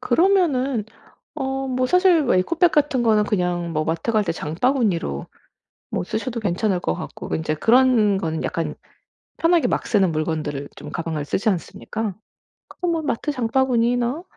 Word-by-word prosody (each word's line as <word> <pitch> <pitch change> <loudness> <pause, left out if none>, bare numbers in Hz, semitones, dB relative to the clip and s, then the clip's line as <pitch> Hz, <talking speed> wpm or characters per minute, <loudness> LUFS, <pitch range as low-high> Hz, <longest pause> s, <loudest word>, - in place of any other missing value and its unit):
그러면은 275 - +2 0.5
어 270 -2 -2
뭐 255 0 0
사실 360 0 +4
뭐 245 - +2
에코백 335 - +2
같은 290 -4 +2
거는 215 -2 +3
그냥 175 -4 -1
뭐 155 0 0
마트 165 +8 -1
갈 215 -1 +3
때 - - -1
장바구니로 170 - -1 0.7
뭐 - - -1
쓰셔도 230 +4 -3
괜찮을 195 -1 0
것 - - -1
같고 170 -3 -7
인제 155 -1 -1
그런 230 - +4
거는 160 -4 -3
약간 165 -3 -2 0.6
편하게 335 0 +3
막 - - -1
쓰는 190 -6 +2
물건들을 155 -3 -2
좀 - - -9
가방을 160 -3 -3
쓰지 210 +8 -1
않습니까? 210 +2 -3 0.5
그거 360 - -4
뭐 330 -2 0
마트 295 +1 -1
장바구니나 245 +2 +1
225 Hz, 315 characters per minute, -22 LUFS, 175-265 Hz, 0.7 s, 사실